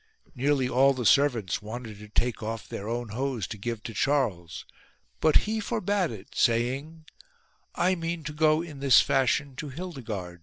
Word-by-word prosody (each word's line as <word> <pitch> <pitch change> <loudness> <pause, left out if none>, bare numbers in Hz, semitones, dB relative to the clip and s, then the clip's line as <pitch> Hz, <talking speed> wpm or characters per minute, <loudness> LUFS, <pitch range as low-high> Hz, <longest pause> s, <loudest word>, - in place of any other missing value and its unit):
Nearly 135 -1 +1
all 135 +2 +4
his 125 -4 +3
servants 120 -10 +2
wanted 110 0 -7
to 105 0 -11
take 120 +2 0
off 110 0 -5
their 100 +2 -6
own 120 -1 -3
hose 125 -1 -2
to - - -6
give 115 0 -4
to 115 - -6
Charles, 105 - -1 0.5
but 155 - +3
he 220 +1 -1
forbade 205 -4 0
it 105 -4 -10
saying: 135 +7 0 0.7
"I 180 +2 +2
mean 165 -2 -3
to 150 0 -5
go 155 +1 +3
in 155 -5 -9
this 135 -3 +6
fashion 135 +1 +1
to 150 - -5
Hildigard."' 120 - -6
130 Hz, 165 wpm, -27 LUFS, 115-155 Hz, 0.7 s, this